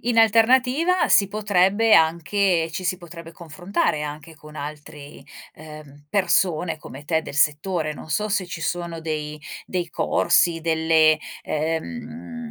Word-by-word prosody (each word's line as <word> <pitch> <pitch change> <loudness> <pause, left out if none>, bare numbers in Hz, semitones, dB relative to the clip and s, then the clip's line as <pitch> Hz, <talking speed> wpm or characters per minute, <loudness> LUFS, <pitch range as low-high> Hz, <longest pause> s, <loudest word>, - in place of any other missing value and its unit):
In 235 0 0
alternativa 255 - +3
si 200 - +5
potrebbe 205 +1 +2
anche 170 +2 +2
ci 175 +3 -5
si 185 0 -1
potrebbe 170 -1 -11
confrontare 170 -1 -2
anche 150 +2 -7
con 150 +1 -14
altri, 150 0 -9 0.3
uhm, 150 -2 -13
persone 180 -4 +1
come 145 -1 -11
te 160 -1 +1
del 140 - -9
settore. 155 +2 0
Non 155 - -11
so 210 +8 0
se 200 -2 0
ci 170 -1 -7
sono 170 0 -3
dei 150 -1 -5 0.2
dei 180 -2 -3
corsi, 165 +1 +1
delle 160 -1 +3 0.2
ehm 235 +9 -5
165 Hz, 135 wpm, -23 LUFS, 155-200 Hz, 0.3 s, si